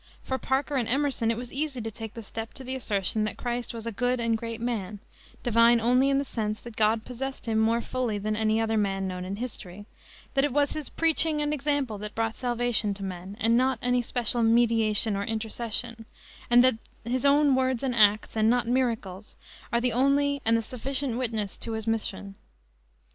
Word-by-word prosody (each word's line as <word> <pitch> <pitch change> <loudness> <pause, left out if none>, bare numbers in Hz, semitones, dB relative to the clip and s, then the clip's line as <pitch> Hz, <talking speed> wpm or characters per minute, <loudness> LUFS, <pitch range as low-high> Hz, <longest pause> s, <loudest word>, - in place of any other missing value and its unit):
For 260 0 -2
Parker 275 +3 0
and 235 -3 0
Emerson 270 -3 +1
it 230 - 0
was 245 0 -7
easy 280 -2 -2
to 225 -1 -4
take 220 0 -8
the 230 - -7
step 225 +2 -7
to 265 - -7
the 260 +1 -4
assertion 215 -4 0
that 215 - -3
Christ 240 -1 -3
was 230 -1 -7
a 230 - -2
good 245 +3 0
and 230 -1 +1
great 230 0 -5
man, 220 -4 -3 0.5
divine 235 0 +5
only 250 +4 +3
in 275 - +3
the 280 - 0
sense 215 -4 -3
that 235 -2 -10
God 220 +1 +2
possessed 265 +2 -5
him 220 -1 +1
more 225 +2 +2
fully 245 -3 -2
than 215 +1 -2
any 220 0 +1
other 225 0 +1
man 195 -2 0
known 180 -1 -5
in 190 +2 -4
history; 205 -4 -6 0.5
that 270 - +2
it 290 - +1
was 285 0 +2
his 305 -2 -5
preaching 320 -1 +2
and 295 0 +1
example 280 -6 -1
that 210 0 -6
brought 225 0 -1
salvation 240 -4 0
to 195 - -7
men, 190 +1 -6
and 230 +1 +3
not 260 +1 +2
any 245 0 +2
special 240 0 0
mediation 225 -2 +3
or 200 - -2
intercession, 225 +1 -4 0.4
and 240 +1 +7
that 255 -3 +3 0.3
his 245 +1 -1
own 285 0 +5
words 260 -1 +1
and 260 -2 0
acts, 215 -2 +3
and 220 0 +3
not 245 0 +2
miracles, 225 -6 -2 0.4
are 235 - +2
the 245 -1 0
only 280 +3 +2
and 225 +1 +4
the 225 - -2
sufficient 260 +2 -2
witness 220 -5 -2
to 230 - -4
his 220 -1 -4
mission. 210 -3 -2
230 Hz, 205 wpm, -27 LUFS, 220-255 Hz, 0.5 s, and